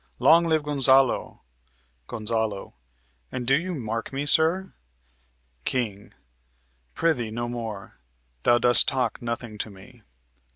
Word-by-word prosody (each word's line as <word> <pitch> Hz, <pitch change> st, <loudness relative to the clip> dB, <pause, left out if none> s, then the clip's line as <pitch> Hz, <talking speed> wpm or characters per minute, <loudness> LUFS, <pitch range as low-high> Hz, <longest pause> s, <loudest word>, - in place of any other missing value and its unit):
Long 170 Hz, +2 st, +4 dB
live 160 Hz, -2 st, 0 dB
Gonzalo! 135 Hz, -3 st, +2 dB, 0.7 s
Gon. 110 Hz, -2 st, -3 dB, 0.6 s
And 125 Hz, -1 st, -5 dB
do 135 Hz, +3 st, +3 dB
you 175 Hz, +4 st, -3 dB
mark 115 Hz, -4 st, -5 dB
me, 140 Hz, +2 st, -4 dB
sir? 165 Hz, +5 st, +2 dB, 0.9 s
King. 105 Hz, -6 st, -4 dB, 0.8 s
Pr'ythee, 140 Hz, -9 st, -1 dB
no 120 Hz, +2 st, -4 dB
more; 115 Hz, -5 st, -8 dB, 0.4 s
thou 120 Hz, -, +3 dB
dost 120 Hz, 0 st, +8 dB
talk 130 Hz, -2 st, -2 dB
nothing 115 Hz, -2 st, -6 dB
to 110 Hz, -, -4 dB
me. 110 Hz, +5 st, -17 dB
120 Hz, 115 wpm, -24 LUFS, 110-145 Hz, 0.9 s, dost